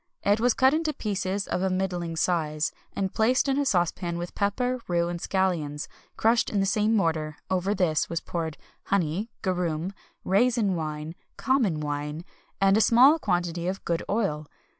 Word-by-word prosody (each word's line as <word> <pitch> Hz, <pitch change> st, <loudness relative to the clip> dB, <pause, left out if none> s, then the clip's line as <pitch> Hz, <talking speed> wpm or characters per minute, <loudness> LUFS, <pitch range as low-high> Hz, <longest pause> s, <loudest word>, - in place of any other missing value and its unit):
It 205 Hz, +2 st, +3 dB
was 245 Hz, +1 st, +3 dB
cut 265 Hz, +1 st, +4 dB
into 315 Hz, -1 st, 0 dB
pieces 200 Hz, -4 st, -2 dB
of 180 Hz, -, -1 dB
a 190 Hz, -, +1 dB
middling 180 Hz, -3 st, -2 dB
size, 160 Hz, -3 st, 0 dB, 0.2 s
and 195 Hz, -1 st, -2 dB
placed 245 Hz, +5 st, +2 dB
in 270 Hz, +1 st, +1 dB
a 285 Hz, -, +1 dB
saucepan 175 Hz, -3 st, 0 dB
with 175 Hz, 0 st, -5 dB
pepper, 245 Hz, +5 st, -1 dB
rue, 170 Hz, -1 st, +1 dB
and 175 Hz, 0 st, -4 dB
scallions, 170 Hz, -7 st, -1 dB, 0.3 s
crushed 230 Hz, +1 st, +3 dB
in 205 Hz, -, 0 dB
the 195 Hz, -, +2 dB
same 210 Hz, +3 st, +2 dB
mortar; 160 Hz, -6 st, 0 dB
over 190 Hz, +2 st, +1 dB
this 170 Hz, -5 st, +1 dB
was 170 Hz, -, -1 dB
poured 160 Hz, -3 st, -4 dB, 0.3 s
honey, 195 Hz, +3 st, 0 dB
garum, 180 Hz, -2 st, -1 dB, 0.3 s
raisin 210 Hz, -1 st, +2 dB
wine, 155 Hz, -1 st, -4 dB, 0.2 s
common 245 Hz, -, +1 dB
wine, 150 Hz, +2 st, -4 dB, 0.3 s
and 195 Hz, +1 st, +4 dB
a -, -, +4 dB
small 255 Hz, +9 st, +6 dB
quantity 175 Hz, -, -1 dB
of 190 Hz, +1 st, -4 dB
good 170 Hz, 0 st, 0 dB
oil. 155 Hz, -9 st, -1 dB
185 Hz, 165 wpm, -26 LUFS, 165-215 Hz, 0.3 s, small